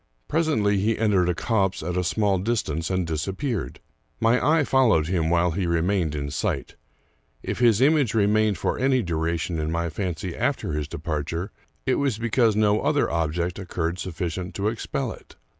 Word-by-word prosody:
Presently 145 -11 +1
he 110 +3 +1
entered 100 -5 +2
a 90 - 0
copse 95 -4 0
at 90 +2 -3
a 90 - +1
small 100 +1 +1
dis 115 +4 0
tance, 80 +2 -3
and 95 -2 0
disappeared. 95 - -3 0.4
My 115 +2 +3
eye 155 +1 +4
followed 125 - +3
him 85 -2 0
while 85 0 +2
he 90 +2 -1
remained 85 -1 +1
in 70 -1 -3
sight. 75 - -2 0.7
If - - -3
his 120 -2 +4
image 140 -4 +3
remained 105 -1 +3
for - - -1
any 130 -2 +2
dura 85 -1 -1
tion 85 0 -3
in 75 +1 -2
my 85 0 -1
fancy 90 0 -4
after - - -1
his 75 -1 -2
departure, 80 +4 -4 0.3
it 130 - +1
was 135 -6 0
because 115 -1 +2
no 105 0 +3
other 150 -1 +1
object 85 +2 -1
occurred 85 -2 -3
sufficient 90 +1 -4
to 100 +2 0
expel 110 -1 -3
it. - - -13
95 Hz, 175 wpm, -24 LUFS, 85-110 Hz, 0.7 s, eye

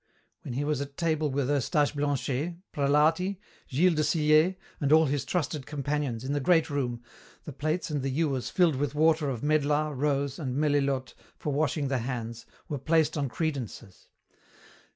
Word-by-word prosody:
When 120 - -6
he 140 - -1
was 145 -1 -1
at 140 0 -7
table 155 -2 +1
with 135 -1 -1
Eustache 145 +1 +1
Blanchet, 145 +2 -1 0.2
Prelati, 155 +7 +2 0.3
Gilles 170 +7 +3
de 155 - +1
Sillé, 155 +3 +3 0.4
all 160 +1 +7
his 140 -3 -1
trusted 150 -5 -2
companions, 140 -4 -2
in 135 +2 -2
the 145 - +1
great 165 +1 +3
room, 120 -4 -2 0.4
the 150 - -8
plates 155 +5 -2
and 145 -2 -1
the 135 - -1
ewers 135 -2 -1
filled 170 -7 +3
with 145 +1 -2
water 155 -1 +3
of 125 -2 -4
medlar, 150 0 +1
rose, 140 0 -1
and 130 -4 -3
melilote 140 -3 +1 0.2
for 150 - -3
washing 145 0 0
the 135 -1 0
hands, 115 -1 -5 0.2
were 145 - -3
placed 155 +2 +2
on 140 -3 -1
credences. 120 - -5
145 Hz, 165 wpm, -28 LUFS, 135-155 Hz, 0.4 s, all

